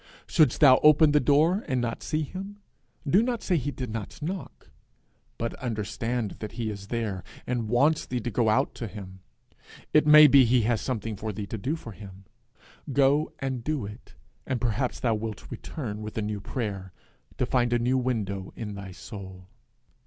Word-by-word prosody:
Shouldst 155 -2 +3
thou 130 -4 +8
open 150 0 +6
the 150 - +5
door 155 - +3
and 130 -4 0
not 120 -1 -2
see 155 0 -1
him, 195 +7 -7 0.5
do 185 +9 +5
not 240 -1 -1
say 180 - +1
he 145 -3 -1
did 130 -5 -5
not 110 - -6
knock, 175 +4 -6 0.7
but 115 0 -2
understand 115 -1 -3
that 105 - -6
he 115 -2 -3
is 100 -1 -8
there, 105 -5 -3 0.2
and 120 -3 -2
wants 145 +7 +2
thee 125 - -2
to 120 - -3
go 110 +1 +2
out 130 +6 +2
to 115 - -5
him. 95 -2 -9 0.7
It 150 0 +5
may 150 0 +10
be 140 -2 +7
he 120 0 +3
has 115 0 +1
something 115 -4 -3
for 110 +2 -4
thee 105 0 -5
to 110 - -5
do 135 +10 -1
for 120 -8 -9
him. 95 -1 -12 0.7
Go 140 +3 +3
and 130 -3 -3
do 150 -5 -2
it, 105 +1 -11 0.3
and 130 - -1
perhaps 120 +2 -1
thou 120 -2 +1
wilt 110 -1 -5
return 110 -8 -6
with 105 +1 -7
a 110 - 0
new 105 -1 -3
prayer, 100 -4 -4 0.4
to - - +1
find 120 -2 +1
a 120 - +3
new 125 +2 +1
window 100 -7 -2
in 105 -3 -5
thy 100 -2 -8
soul. 95 -3 -10
120 Hz, 190 wpm, -27 LUFS, 105-140 Hz, 0.7 s, may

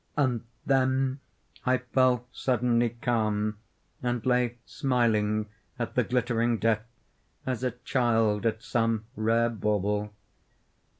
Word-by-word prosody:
And 125 -5 +1 0.2
then 130 0 +2 0.4
I 130 0 +3
fell 125 -1 +2
suddenly 120 -2 +1
calm, 105 -3 0 0.4
and 120 -2 -1
lay 125 -1 +2
smiling 110 -5 +1 0.3
at 120 -1 -3
the 125 - +3
glittering 120 -1 +1
death, 110 0 +1 0.6
as 130 -1 -2
a 125 - +2
child 115 -3 +1
at 110 0 -2
some 115 -2 0
rare 115 +2 +2
bauble. 105 -1 0
120 Hz, 110 wpm, -28 LUFS, 110-125 Hz, 0.6 s, I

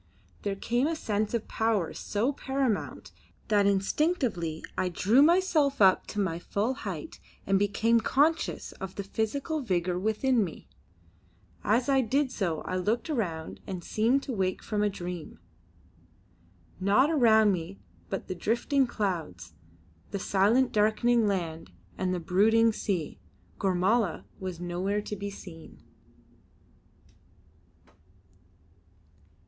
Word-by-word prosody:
There 200 -1 -2
came 240 +7 0
a 330 - -1
sense 215 -5 -1
of 230 - -3
power 220 -6 0
so 230 +7 -1
paramount 265 -5 -2 0.4
that 205 -2 +4
instinctively 200 - 0
I 185 - 0
drew 210 +9 +3
myself 315 -4 +3
up 190 -2 +5
to 210 - -4
my 180 -4 -1
full 205 +7 -1
height 195 - -7 0.3
and 195 0 +2
became 220 +3 +2
conscious 305 +8 +1
of 190 -1 -8
the 200 - -4
physical 275 - -2
vigour 180 -6 -1
within 220 +4 +1
me. 170 -5 -7 1.0
As 235 +4 +2
I 270 -1 +4
did 265 +3 0
so 175 -10 -2
I 185 - -3
looked 225 - -1
around 170 - -3
and 185 -3 -5
seemed 240 +9 +1
to 265 - -4
wake 185 -3 -1
from 210 -2 -1
a 210 - +2
dream. 180 -4 -7 1.4
Naught 210 +10 +3
around 220 -8 +5
me 180 +1 -4 0.3
but 195 - -4
the - - -3
drifting 240 +8 +1
clouds, 165 - -3 0.6
the - - -3
silent 205 +7 +2
darkening 220 +2 +3
land 165 - -3 0.3
and 185 -1 -1
the 180 - -1
brooding 220 +6 +3
sea. 180 -8 -3 0.4
Gormala 190 +1 +1
was 185 -3 -5
nowhere 185 +4 -2
to 210 - -5
be 200 0 -5
seen. 175 -5 -12
205 Hz, 125 wpm, -28 LUFS, 185-240 Hz, 1.4 s, up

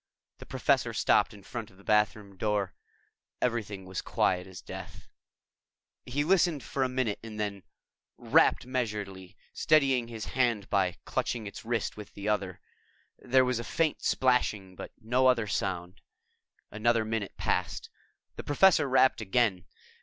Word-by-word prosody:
The - - -11
Professor - - +1
stopped - - +3
in 100 -2 -14
front 115 +1 -6
of 95 - -21
the 100 - -18
bathroom 105 -1 +1
door. 105 -1 -1 0.7
Everything 105 -5 -2
was 95 -1 -4
quiet 90 0 0
as 95 -2 -10
death. - - -9 1.0
He 140 +4 0
listened 165 -4 +2
for 135 - -3
a 130 - +2
minute 125 -5 -1
and 110 -2 -8
then 100 -2 -3 0.6
rapped - - +3
measuredly, 105 -7 -4 0.2
steadying 135 -6 +3
his 115 -2 -6
hand 120 -6 0
by 95 -3 +2
clutching 115 -3 -2
its 100 - -8
wrist 115 -1 -2
with 105 - -10
the 100 +1 -6
other. 100 -4 -1 0.6
There 130 +1 +3
was 125 -2 0
a - - -4
faint 160 +4 0
splashing, 110 -7 +1
but - - -8
no 125 +3 +2
other 120 -4 +3
sound. 90 -2 -3 0.7
Another 115 +1 +1
minute 110 -2 -3
passed. - - -2 0.5
The - - -5
Professor 145 -1 +4
rapped 130 -2 +4
again. 100 -4 +1
110 Hz, 145 wpm, -29 LUFS, 100-125 Hz, 1.0 s, Professor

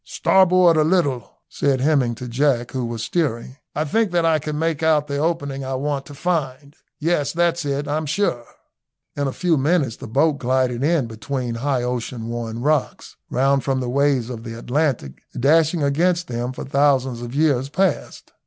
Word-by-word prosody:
"Starboard 185 -3 +4
a 155 - +4
little," 145 - +1 0.2
said 140 -2 0
Hemming 135 -4 +2
to 125 +2 -7
Jack, 120 -1 0
who 130 -1 -3
was 115 -1 -4
steering. 130 -5 -2 0.2
"I 150 - 0
think 220 +8 +1
that 170 -1 +2
I 160 -1 +3
can 150 0 -4
make 160 -1 -1
out 155 -2 +3
the 140 -1 -3
opening 145 -4 -2
I 135 0 -3
want 140 0 -2
to 145 - -10
find; 145 -3 -3 0.2
yes, 155 -2 0
that's 170 -1 0
it, 140 +1 -2
I'm 150 +1 -2
sure." 145 -7 -1 0.7
In 145 -1 -1
a - - -1
few 175 +2 +1
minutes 140 -4 +1
the - - -9
boat 140 +5 +1
glided 130 0 0
in 155 -3 +2
between 120 +2 -4
high 125 +1 -1
ocean 120 -1 -4
worn 115 -1 -4
rocks, 150 -1 -1
round 135 +1 +2
from 135 -1 0
the 125 -1 -3
waves 135 -2 +1
of 115 -2 -7
the 115 -1 -7
Atlantic 125 - -2 0.2
dashing 155 +4 +3
against 170 +5 +1
them 120 +1 -3
for 130 - -7
thousands 135 -3 +1
of 120 +2 -7
years 140 -3 +2
past. 190 +6 -2
140 Hz, 180 wpm, -21 LUFS, 125-155 Hz, 0.7 s, Starboard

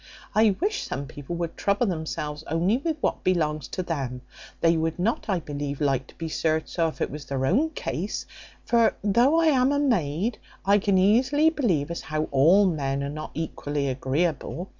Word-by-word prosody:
I 215 -2 +4
wish 405 +2 0
some 140 - -4
people 145 +4 -7
would 170 -1 -3
trouble 200 +4 +1
themselves 160 -4 -3
only 175 +8 +2
with 310 +3 -2
what - - -1
belongs 155 -5 0
to 185 - -4
them; 135 -7 -3 0.4
they 165 0 +4
would 160 0 -1
not, 205 +7 0
I 190 -3 +1
believe, 145 -2 -5
like 135 -3 0
to - - -17
be 165 - -5
served 160 0 0
so, 165 -2 +1
if 160 - -7
it - - -1
was 150 0 -7
their 130 0 -2
own 265 - +2
case; 205 - -4 0.4
for 235 -1 +3
though 240 +10 +4
I 330 - +3
am 270 -3 +4
a 285 - +1
maid, 215 - 0 0.3
I 200 +1 +5
can 200 -1 +2
easily 255 +11 +4
believe 175 - 0
as 170 - -4
how 155 -1 -2
all 165 +9 +5
men 140 -6 -1
are 140 - -3
not 155 +1 -6
equally 145 -3 -2
agreeable. 150 +6 -2
170 Hz, 190 wpm, -25 LUFS, 145-215 Hz, 0.4 s, I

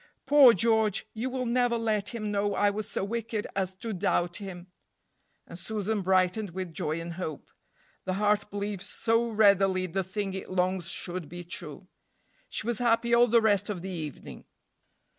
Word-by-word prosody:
Poor 280 -3 +8
George! 220 0 +2
you 230 +4 -3
will 255 0 -3
never 245 0 +2
let 215 -3 -1
him 215 -3 -4
know 205 0 0
I 205 +1 +3
was 210 +1 -4
so - - -2
wicked 220 0 -3
as 190 -1 -2
to 220 +3 -5
doubt 175 -2 0
him." 185 -3 -8 0.8
And 170 - -10
Susan 215 +1 -2
brightened 185 +1 +1
with 185 -3 -4
joy 155 +1 -2
and 170 0 -6
hope. 165 -4 -6 0.5
The 185 - -1
heart 210 +1 +1
believes 200 -1 -4
so 230 +1 +1
readily 195 -4 +4
the 190 +2 -2
thing 195 +1 -4
it 190 - -6
longs 185 -1 0
should 175 -3 -4
be 175 +1 -7
true. 170 0 -7 0.6
She - - -3
was 235 -2 -1
happy 235 0 +2
all 240 +1 +6
the 230 0 +4
rest 205 -1 +2
of 185 -4 -4
the 190 - -5
evening. 155 -5 -7
200 Hz, 175 wpm, -28 LUFS, 185-220 Hz, 0.8 s, Poor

